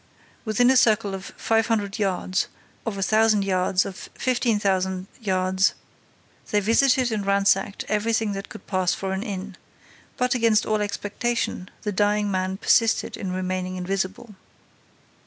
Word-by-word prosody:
Within 245 +4 +3
a 265 - +4
circle 215 -4 +3
of 190 0 -6
five 225 -1 +1
hundred 205 -3 -1
yards, 185 -2 0 0.4
of 210 -3 -2
a 195 - -1
thousand 215 0 +3
yards, 185 0 +1
of 190 - -8
fifteen 240 -4 +1
hundred 190 -2 0
yards, 185 -3 +1 0.7
they 210 - +2
visited 245 +4 +3
and 210 -2 -1
ransacked 200 0 +1
everything 220 0 0
that 195 0 -6
could - - -11
pass 185 -2 0
for 190 -1 -3
an 190 - -2
inn. 200 -3 -6 0.6
But, 250 +1 +1
against 230 -3 +3
all 215 -1 0
expectation, 205 -1 -2
the 210 - -1
dying 205 +1 +1
man 185 0 -1
persisted 225 +2 +2
in 190 -3 -4
remaining 185 0 -3
invisible. 195 +4 -3
200 Hz, 145 wpm, -24 LUFS, 190-220 Hz, 0.7 s, a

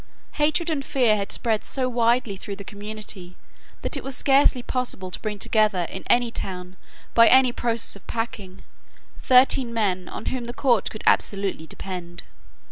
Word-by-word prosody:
Hatred 310 +3 +1
and 285 -3 -2
fear 245 -6 +2
had 200 -1 -3
spread 225 -3 0
so 260 -2 -1
widely 235 -3 +1
through 200 +1 -7
the 200 - -9
community 205 -3 -6 0.5
that - - -1
it - - -5
was 270 -2 -4
scarcely 270 -2 +3
possible 240 -9 -3
to - - -4
bring 215 -2 -4
together 210 -3 +1
in - - -7
any 240 -1 +3
town, 180 -3 -6 0.4
by 230 0 +7
any 260 -1 +6
process 235 -3 -2
of 200 - -16
packing, 205 -5 -5 0.6
thirteen 255 -1 +5
men 190 -6 -1
on - - -7
whom 250 -2 -4
the 240 +1 -7
court 240 -7 +2
could 215 - -8
absolutely 195 -5 +1
depend. 175 -2 -7
225 Hz, 165 wpm, -24 LUFS, 195-250 Hz, 0.6 s, by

